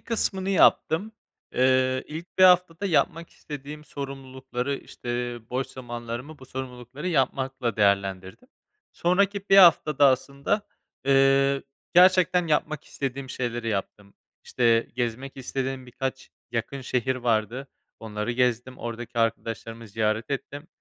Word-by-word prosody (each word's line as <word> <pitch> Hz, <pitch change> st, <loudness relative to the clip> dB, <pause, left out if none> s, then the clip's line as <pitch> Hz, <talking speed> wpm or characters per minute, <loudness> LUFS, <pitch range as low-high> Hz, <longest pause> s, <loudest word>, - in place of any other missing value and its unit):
kısmını 195 Hz, -4 st, -1 dB
yaptım, 195 Hz, +2 st, +3 dB, 0.4 s
ııı, 130 Hz, 0 st, +3 dB
ilk 165 Hz, +5 st, -9 dB
1 185 Hz, -, +8 dB
haftada 180 Hz, +1 st, +4 dB
yapmak 170 Hz, -1 st, +1 dB
istediğim 150 Hz, +1 st, -9 dB
sorumlulukları, 135 Hz, -2 st, -5 dB
işte, 120 Hz, 0 st, -5 dB
boş 130 Hz, +1 st, -1 dB
zamanlarımı 120 Hz, +3 st, -7 dB
bu 130 Hz, -, -13 dB
sorumlulukları 130 Hz, +4 st, -6 dB
yapmakla 130 Hz, -5 st, 0 dB
değerlendirdim. 100 Hz, -, 0 dB, 0.4 s
Sonraki 200 Hz, +3 st, +1 dB
1 195 Hz, -, +7 dB
haftada, 155 Hz, -6 st, +7 dB
aslında, 140 Hz, +9 st, +1 dB, 0.4 s
ııı, 135 Hz, 0 st, +4 dB, 0.3 s
gerçekten 180 Hz, -1 st, +5 dB
yapmak 155 Hz, -1 st, 0 dB
istediğim 135 Hz, -1 st, -5 dB
şeyleri 120 Hz, -2 st, -3 dB
yaptım. 100 Hz, -1 st, -4 dB, 0.3 s
İşte, 115 Hz, -2 st, +2 dB
gezmek 125 Hz, +2 st, -3 dB
istediğim 130 Hz, 0 st, -4 dB
birkaç 130 Hz, +2 st, -5 dB, 0.2 s
yakın 120 Hz, +4 st, -3 dB
şehir 130 Hz, 0 st, -1 dB
vardı, 120 Hz, +2 st, -1 dB, 0.3 s
onları 110 Hz, +1 st, -3 dB
gezdim. 125 Hz, 0 st, 0 dB
Oradaki 120 Hz, 0 st, -6 dB
arkadaşlarımı 115 Hz, 0 st, -2 dB
ziyaret 110 Hz, +3 st, -1 dB
ettim, 145 Hz, +2 st, -5 dB
130 Hz, 110 wpm, -26 LUFS, 120-150 Hz, 0.4 s, 1